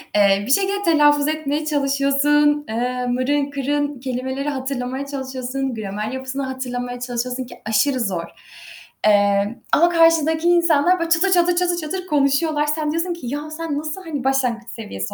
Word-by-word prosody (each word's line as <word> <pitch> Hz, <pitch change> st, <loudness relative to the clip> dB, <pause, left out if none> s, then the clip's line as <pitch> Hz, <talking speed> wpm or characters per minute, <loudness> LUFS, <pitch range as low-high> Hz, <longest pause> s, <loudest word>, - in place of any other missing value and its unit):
Eee, 200 Hz, -1 st, +4 dB
bir -, -, 0 dB
şekilde 395 Hz, +4 st, +2 dB
telaffuz 295 Hz, -2 st, +4 dB
etmeye 305 Hz, -1 st, -2 dB
çalışıyorsun, 290 Hz, +1 st, +2 dB
eee, 250 Hz, +2 st, -2 dB
mırın 275 Hz, +3 st, 0 dB
kırın 285 Hz, 0 st, -2 dB
kelimeleri 260 Hz, +2 st, -3 dB
hatırlamaya 265 Hz, 0 st, -3 dB
çalışıyorsun, 265 Hz, -1 st, -4 dB
gramer 210 Hz, +1 st, -4 dB
yapısını 265 Hz, +1 st, -4 dB
hatırlamaya 245 Hz, -2 st, -4 dB
çalışıyorsun, 250 Hz, +1 st, -3 dB
ki -, -, -11 dB
aşırı 250 Hz, +5 st, +1 dB
zor. 185 Hz, -7 st, -1 dB, 0.8 s
Emm, 205 Hz, +1 st, +3 dB, 0.2 s
ama 345 Hz, +3 st, +5 dB
karşıdaki 330 Hz, -1 st, +3 dB
insanlar 345 Hz, 0 st, +3 dB
böyle 335 Hz, 0 st, -2 dB
çatır 350 Hz, +3 st, +3 dB
çatır, 350 Hz, -1 st, +3 dB
çatır 350 Hz, -1 st, +1 dB
çatır 365 Hz, +3 st, -4 dB
konuşuyorlar. 295 Hz, +1 st, +1 dB
Sen 300 Hz, 0 st, -1 dB
diyorsun 340 Hz, +2 st, -1 dB
ki 340 Hz, -, -10 dB
"Ya, 295 Hz, +4 st, -4 dB
sen 315 Hz, -2 st, -4 dB
nasıl, 310 Hz, +5 st, -5 dB
hani, 295 Hz, -6 st, -5 dB
başlangıç 250 Hz, -4 st, 0 dB
seviyesi 100 Hz, -, -6 dB
280 Hz, 150 wpm, -21 LUFS, 250-310 Hz, 0.8 s, ama